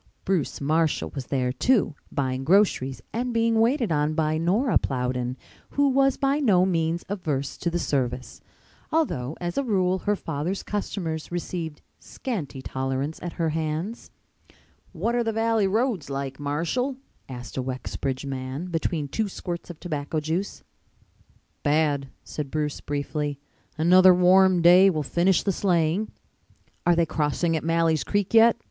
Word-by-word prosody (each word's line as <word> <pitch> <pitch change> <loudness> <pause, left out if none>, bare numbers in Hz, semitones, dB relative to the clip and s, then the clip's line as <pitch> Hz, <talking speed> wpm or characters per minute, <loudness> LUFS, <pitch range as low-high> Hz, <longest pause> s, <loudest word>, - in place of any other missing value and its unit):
Bruce 185 -7 0
Marshall 155 +2 +1
was 135 -3 -6
there, 130 -2 0
too, 215 - +2 0.2
buying 130 -1 -1
groceries 155 -6 +2
and 245 +2 -1
being 230 -1 +2
waited 235 - +2
on 150 0 +1
by 155 -1 +1
Nora 200 +9 +2
Plowden, 125 -1 -2 0.3
who 285 0 +2
was 270 0 +3
by 275 +1 +1
no 195 -10 +4
means 165 -2 0
averse 150 -9 -2
to 170 - -1
the 170 - -1
service, 130 -5 -2 0.5
although 160 - 0
as 175 +4 -2
a - - 0
rule 190 -6 +1
her 205 +2 0
father's 165 +2 -3
customers 170 -6 -4
received 170 -3 -4 0.2
scanty 155 - -5
tolerance 135 +4 -3
at 175 - -5
her 165 -2 0
hands. 160 +7 -3 0.8
"What 200 +7 -1
are 240 0 +1
the 225 - 0
Valley 225 -2 +2
roads 220 - 0
like, 135 0 -4
Marshall?" 170 - -1 0.3
asked 125 -1 -8
a 130 - -1
Wexbridge 130 +1 -4
man, 135 +6 -5
between 160 -2 -1
two 215 +9 -1
squirts 175 -2 -6
of 170 -2 -9
tobacco 155 -2 -3
juice. 165 +6 -3 1.0
"Bad," 145 -2 +1
said 150 -3 -5
Bruce 150 0 -2
briefly. 145 0 -3 0.4
"Another 180 +3 +7
warm 180 0 +5
day 180 +3 +8
will 155 -5 -1
finish 175 +4 +2
the 200 - +1
sleighing." 180 +2 +1 0.8
"Are 175 - +5
they 170 0 +3
crossing 160 +2 0
at 155 - -2
Malley's 165 -1 +2
Creek 205 +1 -1
yet?" 230 +1 +6
165 Hz, 150 wpm, -25 LUFS, 145-195 Hz, 1.0 s, day